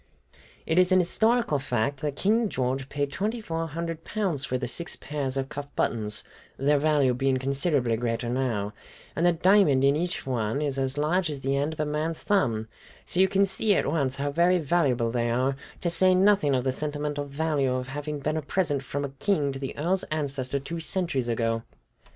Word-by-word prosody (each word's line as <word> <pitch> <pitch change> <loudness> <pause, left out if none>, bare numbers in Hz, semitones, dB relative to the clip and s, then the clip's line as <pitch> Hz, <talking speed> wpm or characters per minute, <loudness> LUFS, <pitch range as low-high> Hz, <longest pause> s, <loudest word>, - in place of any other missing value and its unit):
"It 160 +3 +2
is 185 0 +4
an 185 - +6
historical 220 - +2
fact 135 0 -1
that 150 -3 -2
King 220 +5 +2
George 130 -1 -2
paid 145 -1 -2
twenty 210 +10 -2
four 165 -6 -3
hundred 165 +1 -5
pounds 185 -10 -2
for 130 -2 -1
the 125 -1 -3
six 170 +7 -3
pairs 140 -3 -3
of 135 0 -1
cuff 145 +1 -6
buttons, 105 -2 -1 0.3
their 145 +2 +3
value 145 -4 +3
being 135 +1 +1
considerably 135 -2 +1
greater 115 0 -2
now, 120 -5 -1 0.4
and 170 +2 +2
the - - +6
diamond 175 -5 +4
in 140 +1 +4
each 175 +2 -2
one 120 -1 -1
is 140 -2 -1
as 135 +1 -1
large 160 +4 +1
as 145 -3 -5
the 135 +1 0
end 145 +3 0
of 160 - -13
a 155 - +1
man's 155 +2 -2
thumb; 115 - +1 0.4
so 175 - -2
you 190 - +6
can 195 +1 +3
see 200 +2 +1
at - - +1
once 140 -4 0
how 145 +1 -2
very 175 +4 +3
valuable 135 -8 +1
they 120 0 0
are, 130 +3 +1 0.3
to 175 - 0
say 185 +1 +4
nothing 190 -7 +4
of 125 - 0
the 130 - +1
sentimental 145 +1 -3
value 140 -2 0
of 130 0 -3
having 145 +2 -4
been 155 +2 -2
a - - -1
present 145 -2 0
from 140 +2 -3
a - - -4
king 140 +1 0
to 135 - -6
the 135 -1 -5
Earl's 180 +6 +1
ancestor 140 -3 -2
two 165 +5 -5
centuries 165 -7 -1
ago." 115 -1 0
145 Hz, 205 wpm, -27 LUFS, 130-170 Hz, 0.4 s, an